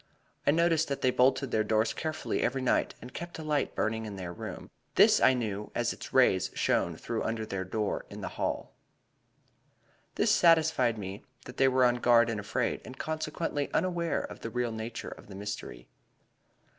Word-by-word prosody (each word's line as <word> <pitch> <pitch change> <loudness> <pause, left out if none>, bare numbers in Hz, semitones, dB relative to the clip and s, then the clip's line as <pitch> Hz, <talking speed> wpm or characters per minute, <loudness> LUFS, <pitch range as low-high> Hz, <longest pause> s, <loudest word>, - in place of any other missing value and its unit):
I - - +6
noticed 165 +1 +3
that 140 - -3
they 130 - +4
bolted 130 +1 +2
their 110 - +2
doors 110 +1 +1
carefully 155 -1 -2
every 130 +1 0
night 125 - +1
and 125 - -10
kept 175 +1 -7
a 160 - -6
light 150 -2 -1
burning 110 0 -1
in 105 - -6
their 90 -2 -6
room. - - -8 0.2
This - - +6
I 130 - +6
knew, 105 -4 -3
as 120 0 0
its - - -9
rays 95 -8 +4
shone - - +1
through - - -4
under 110 -1 -2
their 95 -3 -3
door 105 +3 -2
into - - -8
the - - -4
hall. - - -3 1.4
"This - - +3
satisfied 160 -8 +4
me 100 0 -6 0.2
that 125 - -10
they 135 - +5
were 130 -1 +4
on 120 0 +3
guard 120 -1 +4
and 110 - -3
afraid, 105 - -1
and 130 - -10
consequently 155 -2 -3
unaware 170 -4 0
of - - -8
the 115 - -5
real 120 +1 -1
nature 110 +1 -5
of - - -12
the 100 - -10
mystery. 105 +1 -6
120 Hz, 185 wpm, -30 LUFS, 110-145 Hz, 1.4 s, I